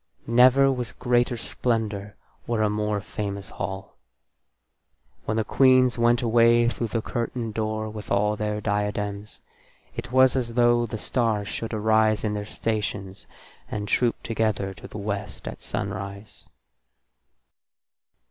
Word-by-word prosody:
Never 130 +3 +5
was 125 -4 -3
greater 120 -1 +1
splendour 110 -4 -2 0.3
or 115 -2 +1
a 105 - +2
more 105 0 -1
famous 100 -1 -5
hall. 95 +1 -6 1.3
When 110 - -1
the 110 - +2
queens 130 0 +4
went 120 +1 +3
away 120 0 +4
through 120 -1 -3
the 110 0 -2
curtained 115 -2 -3
door 110 0 -2
with 105 -1 -8
all 105 +1 +2
their 105 0 -2
diadems, 105 0 -3 0.5
it 120 +1 -6
was 130 0 +5
as 120 -3 -2
though 120 -1 +4
the 110 - -5
stars 110 -3 0
should 115 - -4
arise 110 0 +2
in 105 -1 0
their 105 -1 -4
stations 105 -4 -3 0.4
and 105 -1 -4
troop 120 +3 +1
together 110 -4 -1
to - - -11
the - - -9
West 100 0 -5
at - - -7
sunrise. 100 +1 -5
110 Hz, 135 wpm, -25 LUFS, 105-120 Hz, 1.3 s, Never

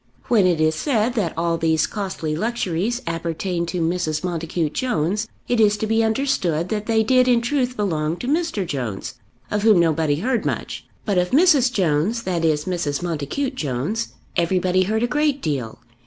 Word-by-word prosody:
When 210 -6 +4
it 170 -3 +1
is 155 0 +3
said 235 - 0
that 200 -9 -1
all 165 0 0
these 160 -1 +2
costly 185 -7 -3
luxuries 220 +2 -1
appertained 170 +1 -2
to 180 0 -2
Mrs. 165 -1 -1
Montacute 165 -3 -2
Jones, 210 - -1 0.2
it 245 -1 +1
is 210 -1 +4
to 220 - -2
be 225 +1 +2
understood 220 - 0
that 215 -1 -3
they 220 -1 +3
did 255 +2 +4
in 245 -2 +4
truth 250 0 -1
belong 165 -5 -1
to 245 - -6
Mr. 310 - 0
Jones, 120 - -4 0.4
of 210 - 0
whom 215 -4 +5
nobody 160 -3 +2
heard 230 - -1
much. - - -4 0.2
But 200 -4 +2
of 180 0 0
Mrs. 285 -4 +5
Jones, 190 +3 +1
that 175 -3 -1
is, 150 -2 +1
Mrs. 175 -4 -2
Montacute 175 - -2
Jones, 155 - -2 0.3
everybody 185 +1 +2
heard 220 +3 0
a - - +2
great 295 +1 +1
deal. 135 - -3
185 Hz, 175 wpm, -22 LUFS, 160-230 Hz, 0.4 s, whom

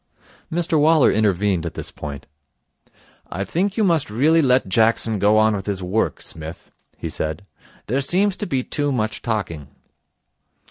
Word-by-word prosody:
Mr 165 -2 +1
Waller 155 -2 +5
intervened 100 -4 +1
at 85 - -5
this - - -5
point. 70 -2 -8 1.1
'I 95 +2 -3
think 190 - -1
you 220 - +2
must 165 - +2
really 150 +10 +3
let 130 -5 +3
Jackson 110 +1 +2
go 105 +2 +4
on 110 0 +3
with 95 0 -6
his 95 -2 -2
work, 100 +5 -1
Smith,' 80 +1 -7 0.3
he - - -5
said. 80 +5 -4 0.4
'There 130 +5 0
seems 190 +7 +2
to 205 - -3
be 130 -2 -1
too 145 +1 -1
much 110 -4 -2
talking.' 85 - -3
110 Hz, 155 wpm, -21 LUFS, 95-150 Hz, 1.1 s, Waller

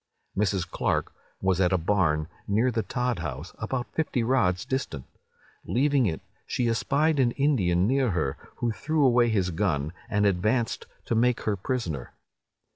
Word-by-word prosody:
"Mrs. 95 -2 0
Clark - - -1 0.3
was 95 -1 +2
at 90 -1 +3
a 95 - +3
barn, 80 -4 +1 0.2
near 110 +5 +2
the 115 -1 0
Todd 125 0 -1
house, 70 +5 -5
about 120 +1 -3
fifty 150 -6 0
rods 115 -8 +2
distant. 130 - -3 0.6
Leaving 135 -1 +2
it, 80 -4 -3 0.3
she 120 - 0
espied 140 +6 +1
an 120 -3 +3
Indian 95 -12 +2
near 130 +2 +2
her, 70 -8 -1 0.2
who 120 - -1
threw 150 +5 +1
away 120 -2 +4
his 95 -5 +1
gun, 80 -4 -1 0.2
and 105 -1 +2
advanced 105 +5 +1 0.2
to - - -1
make 120 +1 +2
her 105 - 0
prisoner. 90 - -3
110 Hz, 155 wpm, -27 LUFS, 90-125 Hz, 0.6 s, away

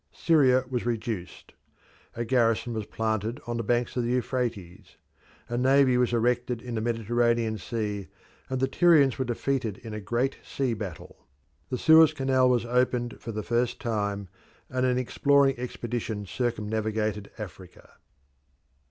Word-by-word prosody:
Syria 130 -6 +3
was 125 -2 -2
reduced. 110 -6 -4 0.6
A 120 - -3
garrison 115 -1 +1
was 110 -2 -4
planted 110 +3 -2
on 120 0 -3
the 115 - -2
banks 120 +2 0
of 125 - 0
the 120 - -1
Euphrates. 120 -7 -3 0.5
A 120 +1 -2
navy 135 0 +4
was 125 -1 +2
erected 120 +1 0
in 120 +1 -7
the 110 - -1
Mediterranean 115 0 0
Sea, 105 -4 -3 0.4
and 130 -1 -2
the 135 - +2
Tyrians 145 -4 +4
were 130 - 0
defeated 120 -2 -2
in 115 -3 -9
a 105 - -5
great 120 +6 -1
sea 130 -3 -2
battle. 100 -6 -8 0.4
The 125 - -2
Suez 160 +2 +6
Canal 130 -3 +2
was 120 -2 +2
opened 120 0 0
for 115 - -5
the 110 -1 -4
first 120 +2 0
time, 100 -3 -2 0.4
and 130 0 +1
an 125 0 +1
exploring 140 +2 +3
expedition 120 -4 -4
circumnavigated 110 -2 -2
Africa. 95 -4 -10
120 Hz, 145 wpm, -27 LUFS, 110-125 Hz, 0.6 s, Suez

